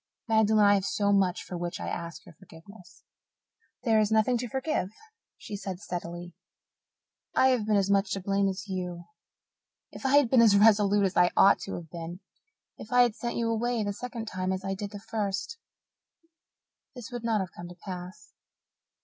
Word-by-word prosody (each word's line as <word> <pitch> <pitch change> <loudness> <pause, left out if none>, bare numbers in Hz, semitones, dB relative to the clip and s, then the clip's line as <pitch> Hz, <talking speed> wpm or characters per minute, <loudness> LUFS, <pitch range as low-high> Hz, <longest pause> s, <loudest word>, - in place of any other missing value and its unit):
Magdalen, 220 -1 +4
I 205 - +6
have 200 +1 0
much 190 -3 +1
for 180 - -7
which 175 0 -4
to - - -7
ask 170 -1 -6
your - - -14
forgiveness." 180 +3 -16 0.8
"There 225 -3 +3
is 215 0 +1
nothing 220 +3 +3
to 245 - -3
forgive," 265 - -2 0.5
she 205 - -8
said 195 -2 -6
steadily. 175 -2 -6 1.0
"I 260 - +5
have 240 -5 +1
been 215 - +3
as 200 0 +2
much 200 0 +2
to 195 - -2
blame 195 +1 +1
as 190 +2 -4
you. 180 -2 -4 0.9
If - - -11
I 270 +1 +4
had 290 -4 +5
been 245 0 +5
as 215 -3 +6
resolute 205 -1 +5
as 190 - -2
I 175 0 +5
ought 195 - +6
to - - -5
have 165 -3 -9
been 170 +1 -7 0.6
if 215 - -10
I 245 0 +6
had 240 -3 +1
sent 235 -1 -4
you 230 -1 0
away 235 0 0
the 205 0 -2
second 230 +1 -6
time 185 -2 -2
as 190 +1 -3
I 195 - -1
did 200 +1 -5
the 205 0 -9
first 215 - -4 1.4
this 245 0 -9
would 240 -1 -6
not 225 -2 +1
have 185 -3 -4
come 175 - -9
to 175 - -11
pass. 180 +1 -9
200 Hz, 190 wpm, -28 LUFS, 185-225 Hz, 1.4 s, I